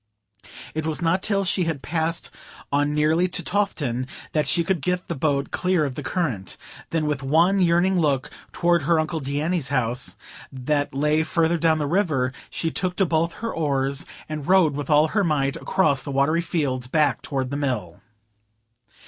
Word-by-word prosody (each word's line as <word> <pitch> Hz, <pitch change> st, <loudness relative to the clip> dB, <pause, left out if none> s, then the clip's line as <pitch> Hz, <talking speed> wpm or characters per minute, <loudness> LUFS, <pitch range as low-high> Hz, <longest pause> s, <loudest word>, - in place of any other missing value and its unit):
It 155 Hz, 0 st, -2 dB
was 155 Hz, -, -1 dB
not 170 Hz, +2 st, +1 dB
till 195 Hz, -1 st, +1 dB
she 180 Hz, -1 st, +1 dB
had 160 Hz, -4 st, -3 dB
passed 165 Hz, 0 st, -2 dB, 0.4 s
on 145 Hz, +1 st, +2 dB
nearly 155 Hz, +4 st, +2 dB
to 180 Hz, 0 st, -1 dB
Tofton 145 Hz, -, -1 dB, 0.2 s
that 150 Hz, -1 st, 0 dB
she 170 Hz, -, +2 dB
could 175 Hz, -2 st, 0 dB
get 180 Hz, +4 st, -1 dB
the -, -, -2 dB
boat 140 Hz, -1 st, 0 dB
clear 180 Hz, -4 st, +1 dB
of 135 Hz, -, -3 dB
the 150 Hz, -, -6 dB
current. 130 Hz, -, -2 dB, 0.3 s
Then 160 Hz, -2 st, 0 dB
with 150 Hz, -2 st, -1 dB
one 165 Hz, +8 st, +3 dB
yearning 180 Hz, +1 st, +3 dB
look 140 Hz, -5 st, 0 dB, 0.2 s
toward 170 Hz, -1 st, +2 dB
her 160 Hz, +3 st, +2 dB
uncle 155 Hz, +1 st, -1 dB
Deane's 145 Hz, +3 st, -1 dB
house 125 Hz, -2 st, -1 dB, 0.3 s
that 145 Hz, +3 st, -1 dB
lay 150 Hz, +2 st, +2 dB
farther 165 Hz, +1 st, +1 dB
down 160 Hz, -1 st, +3 dB
the 150 Hz, -, -1 dB
river, 145 Hz, -7 st, +1 dB, 0.2 s
she 165 Hz, -, -2 dB
took 185 Hz, -2 st, -1 dB
to 195 Hz, -, +2 dB
both 165 Hz, 0 st, +1 dB
her 230 Hz, -, -2 dB
oars 140 Hz, -2 st, 0 dB, 0.2 s
and 155 Hz, -2 st, -5 dB
rowed 180 Hz, -5 st, +5 dB
with 145 Hz, +2 st, -5 dB
all 150 Hz, +1 st, +5 dB
her 210 Hz, -2 st, +1 dB
might 140 Hz, -5 st, +1 dB
across 145 Hz, -8 st, +1 dB
the 140 Hz, -, -5 dB
watery 140 Hz, +5 st, +2 dB
fields, 135 Hz, -7 st, -2 dB
back 150 Hz, +2 st, +2 dB
toward 135 Hz, -2 st, -3 dB
the -, -, -2 dB
Mill. 120 Hz, -, -3 dB
155 Hz, 180 wpm, -23 LUFS, 140-170 Hz, 0.4 s, rowed